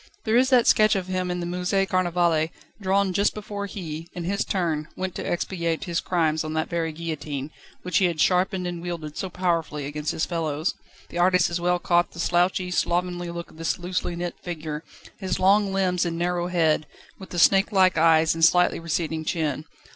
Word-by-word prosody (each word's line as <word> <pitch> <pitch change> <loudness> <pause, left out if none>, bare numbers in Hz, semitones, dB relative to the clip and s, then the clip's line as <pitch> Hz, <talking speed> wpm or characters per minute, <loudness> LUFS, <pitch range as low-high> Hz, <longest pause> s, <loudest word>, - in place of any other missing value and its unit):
There 220 -1 +1
is 255 +2 +4
that 250 -3 +5
sketch 215 0 +5
of 190 -2 -1
him 185 -1 -2
in 180 0 -2
the - - -3
Musée 180 +2 0
Carnavalet, 175 -3 +1 0.3
drawn 195 0 +1
just 200 +2 +2
before 205 -1 -5
he, 165 -4 -7
in 175 - -5
his 200 +4 0
turn, 160 -5 -1
went 185 -1 -3
to - - -5
expiate 170 -2 -2
his 175 -2 -1
crimes 160 -3 0
on 155 0 -4
that 160 0 -1
very 165 -1 -1
guillotine, 150 -3 -5 0.3
which 180 - +1
he 190 - +3
had 170 -3 -1
sharpened 180 +1 +2
and 175 -1 -4
wielded 165 -4 -5
so 190 - -4
powerfully 165 -5 -1
against 150 +1 -3
his 160 - -1
fellows. 160 -1 -1 0.4
The 175 - -5
artist 180 0 +4
has 170 0 -3
well 180 0 +2
caught 175 0 +1
the 170 - -10
slouchy, 180 +1 +1
slovenly 175 0 0
look 170 0 -7
of 160 - -17
his 165 - -1
loosely 180 -1 -3
knit 175 0 -3
figure, 155 -3 -5 0.4
his 190 -3 -2
long 200 +1 +4
limbs 185 -2 +1
and 170 -2 -2
narrow 175 0 0
head, 160 -4 +1 0.3
with 190 - -10
the 175 - -6
snakelike 195 +1 +4
eyes 160 0 +4
and 165 0 -3
slightly 180 +1 +4
receding 160 -1 -2
chin. 155 -3 -2
175 Hz, 195 wpm, -25 LUFS, 160-185 Hz, 0.4 s, that